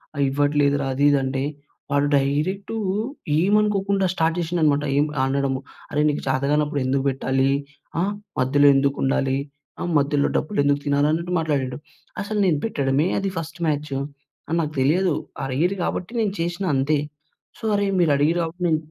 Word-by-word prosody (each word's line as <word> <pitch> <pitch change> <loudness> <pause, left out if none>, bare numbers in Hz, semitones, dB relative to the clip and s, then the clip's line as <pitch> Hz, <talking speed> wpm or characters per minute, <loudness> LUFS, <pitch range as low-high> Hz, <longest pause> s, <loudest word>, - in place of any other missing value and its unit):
ఆహ్, 140 - +1
ఇవ్వట్లేదురా 145 -1 +2
అది 140 +2 +2
ఇది 140 - +3
అంటే, 135 0 -1 0.5
వాడు 145 0 +2
డైరెక్టూ 155 +10 -1 0.6
ఏమనుకోకుండా 200 0 +2
స్టార్ట్ 165 -1 0
చేషిండనమాట, 160 -4 +1
ఏం 145 - +4 0.2
అనడము, 135 -1 0 0.3
"అరే 150 - +1
నీకు 145 - -2
చేతగానప్పుడు 145 +2 +1
ఎందుకు 135 +1 +1
బెట్టాలీ? 135 0 0 0.5
ఆహ్, 200 +3 0 0.3
మధ్యలో 145 +3 +4
ఎందుకుండాలి? 135 -1 +1 0.4
ఆహ్, 175 - -2
మధ్యలో 140 0 +1
డబ్బులెందుకు 145 -5 +1
తినాలి?" 145 0 +2
అన్నట్టు 170 +2 -2
మాట్లాడిండు. 145 -5 -1 0.4
అసలు 210 +1 -2
నేను 155 -5 +2
పెట్టడమే 140 -5 +1
అది 195 -1 -2
ఫస్ట్ 165 +2 -6
మ్యాచ్. 150 -1 -1 0.6
అని 165 - +1
నాకు 150 -1 -3
తెలియదు. 175 +5 +2 0.3
అడిగిర్రు 155 +9 0
గాబట్టి 180 +4 -3
నేను 205 -3 0
చేషిన 175 +3 -2
అంతే. 140 +3 +2 0.6
సో, - - -20
అరే 200 0 +1
మీరు 160 -4 +3
అడిగిర్రు 165 +4 +2
గాబట్టి, 170 +2 -5
నేన్ 160 - +3
150 Hz, 145 wpm, -23 LUFS, 140-175 Hz, 0.6 s, ఏం